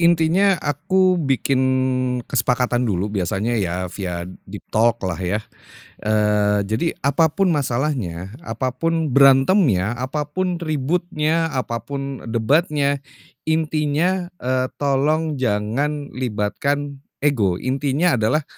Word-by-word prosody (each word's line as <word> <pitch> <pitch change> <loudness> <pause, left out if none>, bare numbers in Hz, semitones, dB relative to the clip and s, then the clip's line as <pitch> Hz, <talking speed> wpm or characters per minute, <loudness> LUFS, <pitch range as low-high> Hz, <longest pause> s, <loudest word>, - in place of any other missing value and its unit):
intinya 170 +3 +4
aku 185 +5 +2
bikin 135 -2 +1 0.6
kesepakatan 125 -1 0
dulu 100 +1 -1
biasanya 100 +4 -1
ya 90 -1 -2
via 90 -3 -4 0.2
deep 100 +1 -9
talk 115 +2 +3
lah 95 -1 -3
ya. 100 +4 -2 0.6
Eee, 105 -1 +2
jadi, 110 +11 0
apapun 160 +5 +2
masalahnya, 120 - -2
apapun 160 +5 -1
berantemnya, 135 - +4
apapun 150 +8 -2
ributnya, 160 +1 0
apapun 130 +2 -4
debatnya. 140 +5 +1 0.5
Intinya, 160 +3 0
eee, 130 -4 -1
tolong 145 +2 0
jangan 130 +6 -1
libatkan 135 +5 -2 0.2
ego, 110 -11 +2
intinya 135 - 0
adalah, 130 +9 +1
135 Hz, 95 wpm, -21 LUFS, 110-155 Hz, 0.6 s, intinya